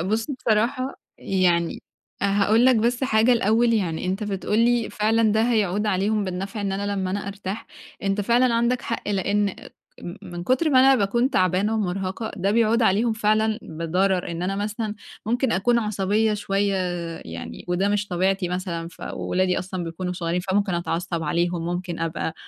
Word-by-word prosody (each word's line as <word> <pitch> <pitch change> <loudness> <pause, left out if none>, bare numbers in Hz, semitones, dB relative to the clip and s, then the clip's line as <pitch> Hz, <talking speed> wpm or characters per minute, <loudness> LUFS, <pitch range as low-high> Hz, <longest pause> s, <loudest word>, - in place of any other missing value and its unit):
بُص، 215 +6 -1
بصراحة 255 +1 0 0.2
يعني 175 -3 +1 0.4
هاقول 205 +4 +3
لك 255 -2 +5
بس 240 +4 +1
حاجة 225 +1 +4
الأول، 230 +1 +3
يعني 180 -5 -1
أنت 190 +3 -2
بتقول 205 +1 -1
لي 235 0 +2
فعلًا 220 0 +2
ده 220 +1 +3
هيعود 215 -3 +1
عليهم 205 +1 +1
بالنفع، 195 +3 -4
إن 200 -1 -1
أنا 200 +1 -2
لمّا 190 -2 -2
أنا 200 +1 -3
أرتاح. 200 +1 -6 0.4
أنت 195 +1 0
فعلًا 235 +3 +3
عندك 235 +2 +1
حق، 230 - -4
لإن 200 +1 +1
آآ، - - -10 0.3
م 175 +3 -7
من 175 -2 -7
كتر 280 - +2
ما 255 - +6
أنا 270 +1 +6
باكون 235 +3 +1
تعبانة 185 - +2
ومرهقة، 195 +1 -2
ده 195 +1 0
بيعود 230 +1 +3
عليهم 220 +3 +3
فعلًا 215 0 +1
بضرر، 175 +3 -1
إن 170 +1 -4
أنا 195 +2 -1
مثلًا 210 +1 -3 0.3
ممكن 245 +1 +1
أكون 235 +6 +2
عصبية 210 0 +1
شوية، 200 0 0 0.5
يعني 85 0 -8
وده 185 +3 +1
مش 205 0 0
طبيعتي 185 +1 0
مثلًا. 175 -2 -3
فولادي 180 +2 -2
أصلًا 185 -1 -4
بيكونوا 180 +2 -4
صغيّرين، 175 0 -2
فممكن 195 0 0
أتعصب 170 0 -2
عليهم، 170 +2 -1
ممكن 175 0 -3
أبقى 165 -1 -3
200 Hz, 165 wpm, -24 LUFS, 180-220 Hz, 0.5 s, ما